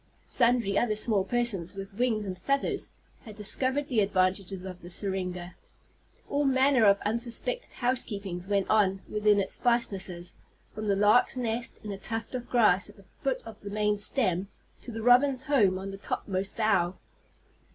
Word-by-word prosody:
Sundry 235 -4 +2
other 220 -3 0
small 210 -2 +1
persons 205 -5 -1
with 195 +1 -7
wings 220 -1 0
and 185 -2 -4
feathers 275 +9 -1 0.3
had 215 -2 -11
discovered 260 +7 +1
the 240 -5 0
advantages 190 -1 0
of 185 -1 -8
the 175 - -10
syringa. 180 -2 -3 0.7
All 285 +1 0
manner 265 -3 +3
of 200 -1 +6
unsuspected 235 - 0
housekeepings 200 -8 -2
went 200 -1 0
on 195 -3 +2
within 210 -1 +2
its 195 - -2
fastnesses, 195 -7 -1 0.4
from 215 0 -5
the 200 - +2
lark's 210 +6 +4
nest, 235 -1 -2
in 210 - -6
a 195 - -6
tuft 225 +4 -5
of 245 -1 -5
grass 210 -6 +3
at 205 - -16
the 195 - -18 0.2
foot 270 -1 -1
of 220 -2 -11
the 200 - -7
main 210 0 0
stem, 200 -4 +4 0.3
to 245 - -8
the 225 -1 -6
robin's 255 +2 +4
home 215 -10 +2
on 195 +1 -6
the 195 - -8
topmost 195 0 -3
bough. 190 -5 +1
210 Hz, 165 wpm, -28 LUFS, 195-240 Hz, 0.7 s, of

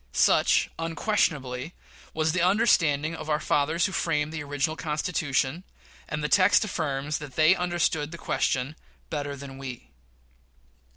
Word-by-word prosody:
Such, - - +4
unquestionably, 165 - -1 0.4
was 160 0 0
the 185 - 0
understanding 170 -6 +3
of 155 - -8
our 150 0 +2
fathers 155 +4 +1
who 195 - -1
framed 155 -4 -1
the 155 - -4
original 145 +2 -1
Constitution; 150 -1 -1 0.5
and 155 -1 -3
the - - +1
text 190 +6 +4
affirms 150 -6 -2
that 145 -4 -9
they 155 +3 +6
understood 175 -4 0
the 170 - -8
question 135 -2 -1 0.4
"better 145 -2 -3
than 135 -1 -9
we." 125 - -8
155 Hz, 135 wpm, -26 LUFS, 140-170 Hz, 0.5 s, they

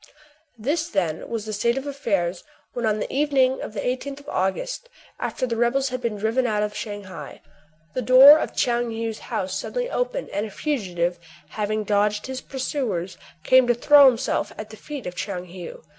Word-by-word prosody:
This, 300 +9 -1
then, 170 -6 -2
was 225 -2 -3
the 215 - -5
state 235 +4 +1
of 270 - -3
affairs 195 -11 -1 0.3
when, 240 -2 -1
on 215 -1 +1
the - - -4
evening 270 -2 +2
of - - -6
the 195 - -2
i8th 275 +3 -3
of - - -11
August, 485 - -2 0.3
after 260 - -2
the 235 -2 -2
rebels 250 +4 +1
had 255 0 -4
been 230 -3 -2
driven 225 +5 +1
out 210 -2 +1
of 210 0 -3
Shang 205 -2 -5
hai, 190 -1 -9 0.5
the 255 - -1
door 270 +5 +9
of - - -3
Tchoung 240 -1 0
Heou*s 225 -1 -4
house - - -3
suddenly - - -3
opened, - - -2
and 210 +2 -2
a - - -9
fugitive, 180 - -2 0.3
having 215 +3 -2
dodged 210 0 +1
his 260 0 -5
pursuers, 250 - -3 0.2
came 255 +6 +5
to 240 - +3
throw 285 +3 +7
himself 255 0 +1
at 215 0 -7
the - - -9
feet 285 +3 -8
of 180 - -4
Tchoung 180 -1 -4
Heou. 180 -2 -9
235 Hz, 190 wpm, -24 LUFS, 205-265 Hz, 0.5 s, door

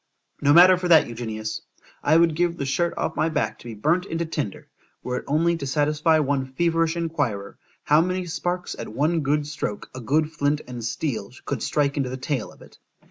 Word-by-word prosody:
—— - - -39
No 145 - +4
matter 180 +4 +8
for 180 - -2
that, 165 -3 +6
Eugenius; 110 -2 -5 0.4
I 155 +2 +4
would 165 -2 +4
give 175 +1 0
the 140 - -3
shirt 170 +6 0
off 160 - -2
my 160 - +1
back 155 -2 -2
to - - -16
be 115 -2 -7
burnt 165 - +1
into 165 +1 -2
tinder, 150 -10 -4 0.4
were 125 0 -2
it - - -6
only 165 +4 +2
to 140 - -5
satisfy 150 +3 +2
one 140 -3 0
feverish 165 +4 0
enquirer, 120 -12 -2 0.2
how 150 +2 +5
many 185 +1 -1
sparks 175 +1 -3
at - - -5
one 150 +9 +1
good 150 0 0
stroke, 145 -8 -5
a 130 - -7
good 150 +6 +1
flint 145 -1 0
and 120 -2 -7
steel 115 -2 -3
could 135 -5 -3
strike 145 -1 0
into 135 -3 0
the 130 - -5
tail 130 -2 -3
of - - -16
it. - - -18
150 Hz, 210 wpm, -24 LUFS, 130-165 Hz, 0.4 s, matter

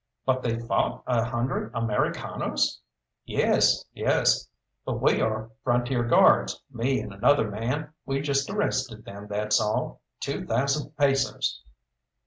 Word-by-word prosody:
"But 130 -1 +2
they 115 -2 -1
fought 115 +1 -1
a 120 -3 +2
hundred 120 0 -2
Americanos!" 115 - -1 0.4
"Yes, - - +2
yes, - - +2 0.4
but - - -3
we - - +3
are 110 0 -1
Frontier 120 0 +1
Guards 120 - +4
me 130 +2 0
and 105 - -7
another 110 +2 +3
man; 130 +9 -3
we 135 0 -1
just 140 -1 0
arrested 130 - -1
them, 100 +1 -9
that's 105 +1 +1
all. 105 0 -2 0.2
Two - - -3
thousand 140 +3 0
pesos!" 135 -2 +1
120 Hz, 125 wpm, -26 LUFS, 110-135 Hz, 0.4 s, Guards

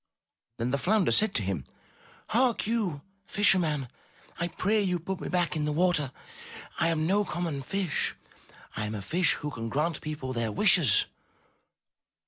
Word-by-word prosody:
Then 120 +1 -1
the 140 - 0
flounder 205 +4 +2
said 215 -1 +4
to 105 - +2
him, 95 -7 -2 0.7
''Hark, 245 -1 +2
you, 200 -10 -1 0.2
fisher 200 -2 +4
man, 150 -6 -1 0.5
I 170 - 0
pray 210 +5 0
you 180 -3 0
put 185 +3 -5
me - - -4
back 175 -3 0
in 150 -1 -1
the 150 - 0
water. 155 -4 +1 0.7
I - - +3
am 160 -1 0
no 200 +5 +3
common 170 -7 -3
fish; 185 +5 -1 0.6
I 105 - -2
am 110 - -4
a 100 - -5
fish 175 - +2
who 150 - -5
can 115 -3 -5
grant 150 +5 -1
people 150 -4 -5
their 115 -2 -1
wishes.'' 170 - +4
165 Hz, 165 wpm, -28 LUFS, 135-190 Hz, 0.7 s, said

